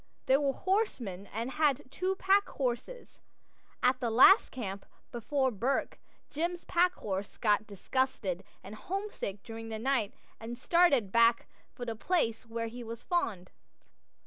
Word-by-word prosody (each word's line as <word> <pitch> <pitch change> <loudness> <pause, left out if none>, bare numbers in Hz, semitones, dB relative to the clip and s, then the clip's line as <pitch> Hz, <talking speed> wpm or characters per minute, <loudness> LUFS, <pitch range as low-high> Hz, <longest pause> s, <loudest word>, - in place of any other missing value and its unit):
They 265 - +4
were 280 0 +2
horsemen 265 - -2
and 230 +4 -3
had 290 -3 +1
two 370 +6 -1
packhorses. 380 - -1 0.6
At 255 +1 +3
the 240 - -1
last 385 - +7
camp 200 -6 -6 0.2
before 260 +3 0
Bourke 245 +6 -1 0.3
Jim's 340 +4 -2
packhorse 215 - 0
got 215 -1 +2
disgusted 200 -3 -2 0.2
and 195 - -9
home 395 - -4
sick 195 - -6
during 225 0 -8
the 220 - -4
night 230 -3 0 0.2
and 230 +2 -6
started 280 - +3
back 230 +1 +4 0.3
for 245 - -6
the 230 -1 -3
place 230 -4 0
where 230 0 -3
he 240 +2 -7
was 230 0 -8
foaled. 220 - -1
245 Hz, 140 wpm, -31 LUFS, 220-305 Hz, 0.6 s, last